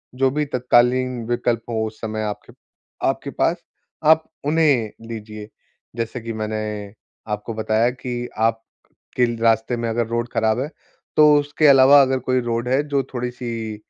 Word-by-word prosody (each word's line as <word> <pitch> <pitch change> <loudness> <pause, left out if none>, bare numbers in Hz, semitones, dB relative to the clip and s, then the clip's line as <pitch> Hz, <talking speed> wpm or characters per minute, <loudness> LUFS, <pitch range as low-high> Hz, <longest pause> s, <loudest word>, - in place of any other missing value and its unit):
जो 135 +1 +2
भी 150 +2 -1
तत्कालीन 125 -1 +2
विकल्प 120 -1 0
हो 110 -1 -1
उस 110 - -11
समय 110 -1 -3
आपके 105 -1 -6 0.5
आपके - - -2
पास, - - 0 0.5
आप 160 +1 +6 0.2
उन्हें 145 -8 +2 0.2
लीजिए। 105 -2 -8 0.5
जैसे 115 +1 -4
कि 115 0 -5
मैंने 110 -1 -4 0.4
आपको 105 +2 -5
बताया 110 +1 +1
कि 120 -1 -5
आप 115 0 +1 0.6
के 120 -2 +2
रास्ते 115 +1 +2
में 115 0 -2
अगर 115 0 0
रोड 120 +1 -2
खराब 110 +2 +1
है, 145 +4 -3 0.5
तो 150 -1 +7
उसके 145 +2 +1
अलावा 140 0 +8
अगर 130 0 +1
कोई 130 0 +3
रोड 120 0 -2
है 130 +3 +2
जो 140 -1 +1
थोड़ी-सी 120 -3 -4
120 Hz, 155 wpm, -21 LUFS, 110-130 Hz, 0.6 s, अलावा